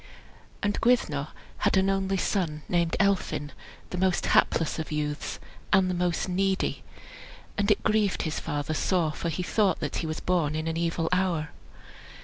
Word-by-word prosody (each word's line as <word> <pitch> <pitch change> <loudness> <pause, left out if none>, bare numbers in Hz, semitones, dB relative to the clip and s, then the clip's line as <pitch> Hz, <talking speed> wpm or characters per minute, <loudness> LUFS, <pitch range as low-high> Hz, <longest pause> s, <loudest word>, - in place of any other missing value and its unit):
And 205 0 0
Gwyddno 155 - +2 0.3
had - - +2
an 190 0 +3
only 195 0 +1
son 165 -6 -1
named 170 -2 +1
Elphin, 190 -7 +1 0.4
the 180 - -3
most 185 -1 +2
hapless 165 0 +2
of 160 - -5
youths, 150 0 -3 0.3
and 190 -2 +4
the - - -1
most 175 0 0
needy. 190 +1 0 0.7
And 205 0 +1
it 210 - +3
grieved 215 -3 +2
his 160 -2 -2
father 145 -1 -3
sore, 165 0 +1
for 170 - -3
he 175 +3 -2
thought 195 -1 +2
that 150 - -3
he 165 - -2
was 155 0 -3
born 165 -5 +1
in 155 +1 -2
an 165 - -1
evil 165 0 0
hour. 180 -4 +1
175 Hz, 165 wpm, -27 LUFS, 155-190 Hz, 0.7 s, and